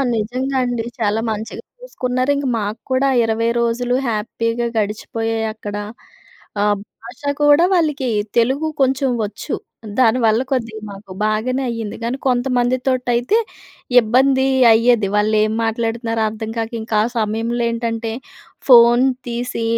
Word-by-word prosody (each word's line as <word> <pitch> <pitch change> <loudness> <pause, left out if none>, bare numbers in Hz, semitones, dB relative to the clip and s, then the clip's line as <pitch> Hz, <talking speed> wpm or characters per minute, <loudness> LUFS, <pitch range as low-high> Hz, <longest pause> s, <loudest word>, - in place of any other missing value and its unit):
నిజంగా 255 +5 -2
అండి. 240 -2 -2 0.2
చాలా 215 0 +1
మంచిగా 215 +1 -6 0.2
చూసుకున్నారు. 255 - -2
ఇంక 280 -1 -2
మాకు 210 +2 -4
కూడా 260 +1 +2 0.2
20 225 +1 0
రోజులు 240 +1 0
హ్యాపీగా 230 +2 -2
గడిచిపోయాయక్కడ. 220 0 -3 0.9
ఆహ్, 205 0 +2 0.3
భాష 235 +4 -12 0.2
కూడా 295 +3 +6
వాళ్ళీకి 300 -7 +1 0.3
తెలుగు 265 +7 +2
కొంచెం 265 0 +2
వచ్చు. 205 0 -5 0.5
దానివల్ల 230 -1 +3
కొద్దిగా 230 -4 -2
మాకు 195 -1 -12
బాగానే 235 +5 0
అయింది. 225 -3 -4
కానీ 240 +3 -2
కొంతమందితోటి 250 0 0
అయితే 245 - +2 0.6
ఇబ్బందీ 265 +4 +3 0.3
అయ్యేది. 230 -2 +3
వాళ్ళేం 215 +1 +2
మాట్లాడుతున్నారో 225 0 -1
అర్థం 220 0 -6
కాక, 225 0 -2
ఇంకాసమయంలో 225 +1 -1
ఏంటంటే 230 -1 -3 0.6
ఫోన్ 240 +1 +7 0.2
తీసి 240 -1 -3
235 Hz, 110 wpm, -19 LUFS, 220-255 Hz, 0.9 s, ఫోన్